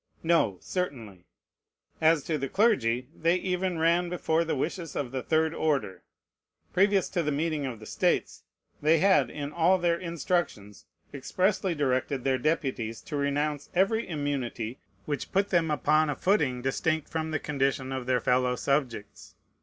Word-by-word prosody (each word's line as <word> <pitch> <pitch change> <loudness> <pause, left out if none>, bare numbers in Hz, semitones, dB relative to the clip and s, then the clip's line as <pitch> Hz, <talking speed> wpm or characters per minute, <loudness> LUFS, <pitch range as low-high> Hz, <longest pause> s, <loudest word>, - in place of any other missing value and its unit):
No, 165 - +2
certainly. 115 - -5 0.7
As 160 -2 +4
to 155 0 -2
the 135 0 -3
clergy, 130 - +2
they 165 +2 +2
even 185 -1 -1
ran 170 +2 +2
before 165 -2 0
the 165 - -2
wishes 165 +3 -3
of 130 -4 -3
the 130 -1 -3
third 160 +3 +1
order. 140 - -1 0.7
Previous 195 +1 +3
to 180 - 0
the 150 -2 -1
meeting 150 -1 -1
of 120 -4 -6
the 110 - -11
States, - - 0 0.4
they 155 +2 +4
had 190 +3 +4
in 145 -1 -5
all 170 +3 +4
their 170 -1 +1
instructions 170 - -3 0.3
expressly 185 +6 0
directed 130 -2 0
their 130 -1 +1
deputies 130 -6 -1
to 170 -6 -7
renounce 145 +1 -1
every 200 +5 +2
immunity 135 -6 -3 0.3
which 145 -2 -4
put 195 +1 +1
them 170 -3 +2
upon 150 +1 +2
a 145 - -1
footing 145 -11 +1
distinct 155 +3 0
from 160 -1 -3
the 155 - 0
condition 135 -2 -1
of 130 -2 -4
their 125 -1 +2
fellow 125 +1 +1
subjects. 125 0 -3
150 Hz, 155 wpm, -28 LUFS, 130-170 Hz, 0.7 s, As